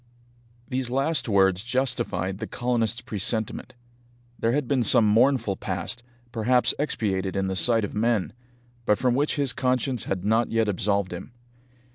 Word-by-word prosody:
These 130 Hz, -2 st, -2 dB
last 135 Hz, +2 st, 0 dB
words 95 Hz, -2 st, +3 dB
justified 120 Hz, -7 st, -1 dB
the 110 Hz, -, -4 dB
colonists' 120 Hz, -1 st, -1 dB
presentiment. 110 Hz, -1 st, -2 dB, 0.6 s
There 115 Hz, -, +1 dB
had 140 Hz, 0 st, 0 dB
been 135 Hz, -1 st, +1 dB
some 115 Hz, 0 st, +5 dB
mournful 115 Hz, -2 st, +2 dB
past, 95 Hz, +5 st, -4 dB, 0.3 s
perhaps 120 Hz, +2 st, +2 dB
expiated 100 Hz, -10 st, -1 dB
in 95 Hz, 0 st, 0 dB
the 95 Hz, 0 st, -2 dB
sight 115 Hz, +4 st, +3 dB
of -, -, -8 dB
men, 110 Hz, -2 st, 0 dB, 0.5 s
but 105 Hz, -, +4 dB
from 125 Hz, -1 st, +1 dB
which 145 Hz, +4 st, 0 dB
his 140 Hz, -4 st, +1 dB
conscience 125 Hz, -2 st, -1 dB
had 95 Hz, -1 st, -3 dB
not 110 Hz, +2 st, +2 dB
yet 115 Hz, -1 st, +1 dB
absolved 100 Hz, -1 st, 0 dB
him. 90 Hz, +7 st, -8 dB
115 Hz, 150 wpm, -25 LUFS, 100-125 Hz, 0.6 s, some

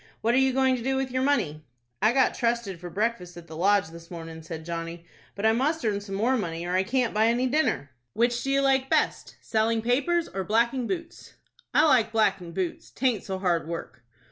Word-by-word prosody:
What 230 Hz, +2 st, +2 dB
are 255 Hz, -, +4 dB
you 265 Hz, 0 st, +3 dB
going 260 Hz, 0 st, +3 dB
to -, -, -6 dB
do 265 Hz, +3 st, 0 dB
with 265 Hz, -1 st, -1 dB
your 255 Hz, +1 st, 0 dB
money?" 170 Hz, -, 0 dB, 0.4 s
"I 220 Hz, -, +5 dB
got 265 Hz, 0 st, +3 dB
trusted 230 Hz, -6 st, -1 dB
for 175 Hz, +1 st, -7 dB
breakfast 190 Hz, -3 st, -2 dB
at 170 Hz, -, -10 dB
the 160 Hz, -1 st, -10 dB
Lodge 195 Hz, 0 st, +2 dB
this 170 Hz, 0 st, -12 dB
mornin'," 165 Hz, -2 st, -8 dB
said 160 Hz, 0 st, -8 dB
Johnny; 170 Hz, 0 st, -5 dB, 0.3 s
"but 200 Hz, -, -3 dB
I 220 Hz, -, +6 dB
must 275 Hz, +5 st, 0 dB
earn 205 Hz, -2 st, 0 dB
some 200 Hz, -1 st, -6 dB
more 235 Hz, +6 st, +2 dB
money, 170 Hz, -7 st, -3 dB
or 175 Hz, -, -2 dB
I 185 Hz, -, +3 dB
can't 245 Hz, +4 st, 0 dB
buy 215 Hz, +1 st, +3 dB
any 240 Hz, +2 st, +2 dB
dinner." 260 Hz, -, 0 dB, 0.2 s
"Which 240 Hz, +2 st, +1 dB
do 270 Hz, -, -3 dB
you 275 Hz, 0 st, +3 dB
like 270 Hz, -1 st, +2 dB
best,—selling 225 Hz, 0 st, 0 dB
papers, 290 Hz, +8 st, +1 dB
or 190 Hz, -, -4 dB
blacking 235 Hz, +4 st, +1 dB
boots?" 335 Hz, -3 st, -6 dB, 0.4 s
"I 310 Hz, -, +5 dB
like 245 Hz, -7 st, +4 dB
blackin' 200 Hz, -6 st, +1 dB
boots. 180 Hz, 0 st, -4 dB
'Taint 245 Hz, -6 st, 0 dB
so 190 Hz, -1 st, -4 dB
hard 175 Hz, -4 st, 0 dB
work." 165 Hz, -7 st, -6 dB
220 Hz, 215 wpm, -26 LUFS, 175-260 Hz, 0.4 s, I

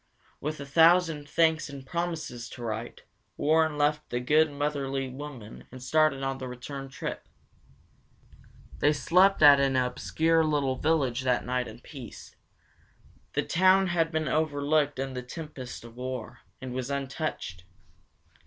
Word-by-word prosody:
With 155 Hz, +1 st, -4 dB
a 140 Hz, -, -6 dB
thousand 165 Hz, 0 st, +4 dB
thanks 160 Hz, -2 st, +2 dB
and 140 Hz, -1 st, -9 dB
promises 165 Hz, -7 st, -4 dB
to 120 Hz, -, -9 dB
write, 115 Hz, +1 st, -5 dB, 0.3 s
Warren 160 Hz, 0 st, +2 dB
left 150 Hz, +1 st, +1 dB
the 120 Hz, -, -1 dB
good, 150 Hz, +5 st, +3 dB
motherly 140 Hz, -2 st, -2 dB
woman 130 Hz, -5 st, -9 dB
and 130 Hz, -, -9 dB
started 145 Hz, +1 st, +2 dB
on 135 Hz, 0 st, -2 dB
the 130 Hz, -, -5 dB
return 135 Hz, +2 st, -7 dB
trip. 135 Hz, -, -6 dB, 1.5 s
They 145 Hz, +8 st, +4 dB
slept 180 Hz, +4 st, +4 dB
at 145 Hz, -1 st, +9 dB
an 135 Hz, -1 st, +2 dB
obscure 160 Hz, +6 st, +1 dB
little 145 Hz, -4 st, +1 dB
village 140 Hz, -6 st, +1 dB
that 125 Hz, -1 st, +1 dB
night 125 Hz, 0 st, -1 dB
in 110 Hz, +2 st, -11 dB
peace. 130 Hz, -5 st, -11 dB, 1.0 s
The -, -, +1 dB
town 185 Hz, +2 st, +4 dB
had 165 Hz, -1 st, +1 dB
been 160 Hz, -1 st, -1 dB
overlooked 145 Hz, -1 st, +1 dB
in 135 Hz, 0 st, -3 dB
the 125 Hz, -, -4 dB
tempest 130 Hz, -2 st, -8 dB
of 120 Hz, 0 st, -13 dB
war, 125 Hz, -2 st, -5 dB, 0.2 s
and 130 Hz, -1 st, -6 dB
was 130 Hz, 0 st, -3 dB
untouched. 140 Hz, -, -4 dB
140 Hz, 145 wpm, -28 LUFS, 130-155 Hz, 1.5 s, at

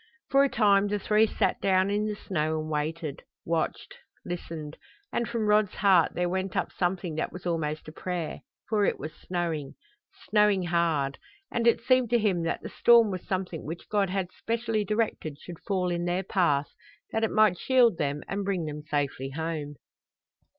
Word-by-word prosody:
For 275 Hz, 0 st, +6 dB
a 280 Hz, -, +2 dB
time 205 Hz, -3 st, +4 dB
the 205 Hz, +1 st, 0 dB
three 215 Hz, +2 st, +3 dB
sat -, -, 0 dB
down 190 Hz, 0 st, +3 dB
in 210 Hz, +1 st, 0 dB
the 210 Hz, -, -2 dB
snow 155 Hz, -5 st, -1 dB
and 155 Hz, 0 st, -5 dB
waited, 155 Hz, 0 st, -3 dB, 0.2 s
watched, 165 Hz, -1 st, -2 dB, 0.3 s
listened; 165 Hz, -3 st, -6 dB, 0.4 s
and 235 Hz, -1 st, -1 dB
from 230 Hz, -2 st, -1 dB
Rod's 210 Hz, -1 st, +3 dB
heart 190 Hz, -4 st, +4 dB
there 180 Hz, 0 st, +1 dB
went 190 Hz, +1 st, -2 dB
up -, -, -1 dB
something 180 Hz, -2 st, -1 dB
that -, -, -1 dB
was 180 Hz, -, -10 dB
almost 155 Hz, -3 st, -2 dB
a -, -, -7 dB
prayer, 175 Hz, 0 st, -4 dB, 0.3 s
for 215 Hz, -2 st, +1 dB
it -, -, +1 dB
was 155 Hz, +2 st, -6 dB
snowing 165 Hz, -6 st, -3 dB, 0.5 s
snowing 210 Hz, -3 st, +3 dB
hard, 165 Hz, -5 st, 0 dB, 0.3 s
and 235 Hz, 0 st, +1 dB
it 235 Hz, -, +4 dB
seemed 255 Hz, -1 st, +3 dB
to 240 Hz, -, +4 dB
him 200 Hz, -6 st, +1 dB
that 165 Hz, 0 st, -2 dB
the -, -, -5 dB
storm 235 Hz, -3 st, +5 dB
was 185 Hz, -2 st, -4 dB
something 185 Hz, -4 st, -3 dB
which 165 Hz, +3 st, -7 dB
God 200 Hz, -3 st, +1 dB
had 185 Hz, -1 st, -2 dB
specially 225 Hz, -2 st, -1 dB
directed 210 Hz, -8 st, -1 dB
should 175 Hz, -2 st, -10 dB
fall 185 Hz, -3 st, 0 dB
in 175 Hz, 0 st, -1 dB
their 175 Hz, +2 st, 0 dB
path 160 Hz, -7 st, +1 dB, 0.4 s
that 225 Hz, -, 0 dB
it 225 Hz, -, +2 dB
might 215 Hz, -5 st, +4 dB
shield 245 Hz, -7 st, +4 dB
them 145 Hz, -1 st, -1 dB
and 200 Hz, +1 st, -2 dB
bring 190 Hz, -4 st, -1 dB
them 150 Hz, 0 st, -5 dB
safely 145 Hz, -3 st, -2 dB
home. 150 Hz, 0 st, -4 dB
180 Hz, 185 wpm, -28 LUFS, 160-210 Hz, 0.5 s, For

